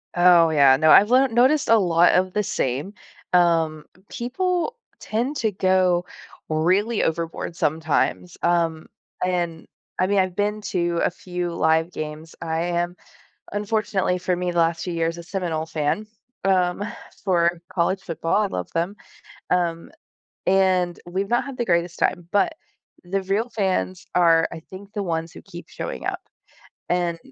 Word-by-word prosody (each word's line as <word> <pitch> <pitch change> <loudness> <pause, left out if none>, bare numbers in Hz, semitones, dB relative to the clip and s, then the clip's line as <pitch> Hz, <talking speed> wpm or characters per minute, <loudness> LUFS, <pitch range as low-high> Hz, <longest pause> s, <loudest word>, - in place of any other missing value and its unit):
Oh, 175 -2 +6
yeah, 140 -4 +5
no. 155 +2 +4
I've 210 +3 +7
learn 260 -1 +4
noticed 265 +5 +3
a 225 - +7
lot 175 -2 +4
of 185 0 +2
the 210 - +1
same, 145 -1 -2 0.4
um, 165 -3 +2 0.2
people 360 - -2 0.2
tend 240 +7 -2
to 220 -2 0
go 185 -2 +2 0.4
really 185 +8 +1
overboard 165 +1 -3
sometimes, 160 +3 0
um, 165 -2 +1 0.4
and, 175 -3 -2 0.3
I 185 - +3
mean, 200 0 +2
I've 185 -1 0
been 210 +1 -1
to 175 -2 0
a - - +3
few 180 -1 -5
live 160 +1 +2
games. 155 0 -7
I 160 0 -2
am 175 0 -1 0.6
unfortunately, 205 -3 0
for 180 0 -1
me, 180 0 -2
last 170 -1 +1
few 180 - -4
years, 165 0 -1
a 170 - -8
Seminole 170 -4 -3
fan, 160 +6 -1 0.4
um, 185 0 +2 0.4
for 175 -3 +1
college 190 +2 0
football; 165 -1 -2
I 210 - +1
love 90 - -5
them. 175 +5 -1 0.6
Um, 170 -2 0 0.6
and 185 -2 +2
we've 190 +3 -2
not 240 - +2
had 275 -2 -7
the 240 - 0
greatest 170 -1 0
time, 175 -1 0
but 205 +9 +2 0.5
the 195 +2 -2
real 200 +5 -1
fans 190 -3 -1
are, 165 -2 +5
I - - -7
think 190 +4 -12
the 205 - -2
ones 165 -2 -3
who - - -11
keep 175 0 -11
showing - - -6
up. - - -2 0.7
And, 175 -1 0
180 Hz, 155 wpm, -23 LUFS, 165-195 Hz, 0.7 s, I've